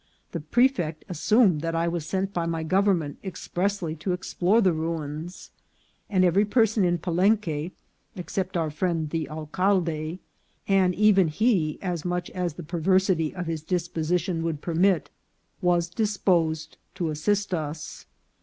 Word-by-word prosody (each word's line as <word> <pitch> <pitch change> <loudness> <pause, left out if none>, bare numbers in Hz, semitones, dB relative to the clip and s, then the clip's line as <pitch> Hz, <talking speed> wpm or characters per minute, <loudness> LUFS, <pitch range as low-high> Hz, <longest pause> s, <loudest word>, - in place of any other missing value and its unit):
The 170 - -3
prefect 170 - +1
assumed 185 -1 +3
that 165 0 -2
I 165 +1 +1
was 170 -2 -3
sent 195 +1 -2
by 170 -2 -1
my 165 -1 -2
government 185 -4 +1
expressly 185 -2 -2
to 180 +4 -2
explore 180 +3 +1
the 190 -6 +3
ruins; 160 +1 -5 0.6
and 185 -2 +3
every 185 +3 +4
person 220 -1 +2
in 175 -1 +2
Palenque 175 -2 +1 0.4
except 185 +1 -3
our 160 -2 -1
friend 160 -1 -1
the 160 -4 -2
alcalde, 160 0 -1 0.5
and 190 -2 +3
even 200 -3 +5
he 165 -3 +1
as 175 -4 -2
much 180 0 -2
as 180 -4 -3
the 175 - -7
perversity 170 0 +1
of 180 -1 -4
his 160 -2 -3
disposi 175 -1 0
tion 170 -1 -3
would 165 -3 -2
permit, 175 0 +2 0.5
was 175 -1 +2
disposed 175 -5 0 0.2
to 170 -4 -1
assist 200 +6 0
us. 155 -2 -5
175 Hz, 145 wpm, -26 LUFS, 160-190 Hz, 0.6 s, even